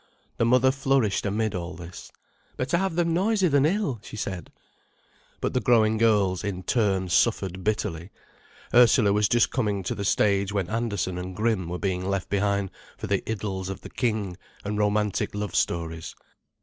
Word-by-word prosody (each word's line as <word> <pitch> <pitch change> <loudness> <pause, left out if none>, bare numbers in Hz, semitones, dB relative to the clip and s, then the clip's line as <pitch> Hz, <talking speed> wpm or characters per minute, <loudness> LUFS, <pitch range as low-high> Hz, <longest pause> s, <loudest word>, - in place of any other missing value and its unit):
The 115 - +2
mother 125 +2 +4
flourished 135 -7 +1
amid 110 +1 -1
all 90 -1 -5
this. 85 0 -10 0.5
"Better 130 +6 0
have 190 -2 -1
them 170 -1 +1
noisy 195 +2 +2
than 145 -2 +3
ill," 180 - -1
she - - -9
said. 95 -5 -5 0.9
But - - -2
the 125 - +2
growing 110 -4 +3
girls, 105 -5 +2
in 95 -3 -4
turn, 95 -3 +1
suffered 95 -1 +1
bitterly. 90 -4 -2 0.6
Ursula 120 -4 +6
was 105 0 +2
just 120 -1 +3
coming 105 -6 -1
to - - -2
the 100 - -5
stage 100 0 +2
when 100 -3 -2
Andersen 100 -6 -2
and 90 +1 -6
Grimm 105 -5 0
were 90 - -3
being 90 -1 -2
left 95 0 -2
behind 100 -1 0 0.3
for - - -5
the - - 0
"Idylls 95 -3 -3
of 95 - -6
the - - -10
King" 105 -7 -1 0.3
and 105 +1 -2
romantic 105 -1 0
love 105 -2 -3
stories. 80 -1 -2
105 Hz, 170 wpm, -26 LUFS, 95-115 Hz, 0.9 s, Ursula